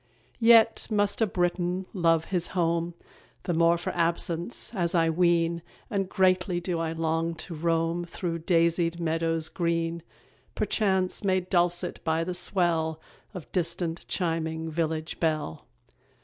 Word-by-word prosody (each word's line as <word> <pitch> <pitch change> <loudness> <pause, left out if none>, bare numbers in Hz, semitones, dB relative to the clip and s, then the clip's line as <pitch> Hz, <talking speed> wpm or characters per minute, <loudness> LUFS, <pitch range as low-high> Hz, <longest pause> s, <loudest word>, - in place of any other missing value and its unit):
Yet 225 -1 +5
must 205 0 +1
a 225 - +4
Briton 180 0 -1
love 165 -4 +2
his 175 -2 +1
home 170 0 0 0.5
The 175 - -1
more 170 +1 +4
for 170 - -4
absence, 170 +5 0
as 175 -4 0
I 165 -1 +3
ween, 170 0 +2 0.3
And 195 -3 -1
greatly 185 -2 +2
do 175 -1 -2
I 165 -1 -1
long 165 +1 -1
to 165 +2 -6
roam 165 +1 0
Through 170 -1 -4
daisied 170 0 +1
meadows 165 -1 -1
green, 165 0 -1 0.5
Perchance 190 -4 0
made 185 -2 0
dulcet 175 0 +1
by 160 0 +1
the 180 +2 -3
swell 170 -3 0 0.4
Of 180 - -8
distant 170 -1 -2
chiming 160 -2 -2
village 160 0 -2
bell. 155 - -2
170 Hz, 135 wpm, -27 LUFS, 165-180 Hz, 0.5 s, Yet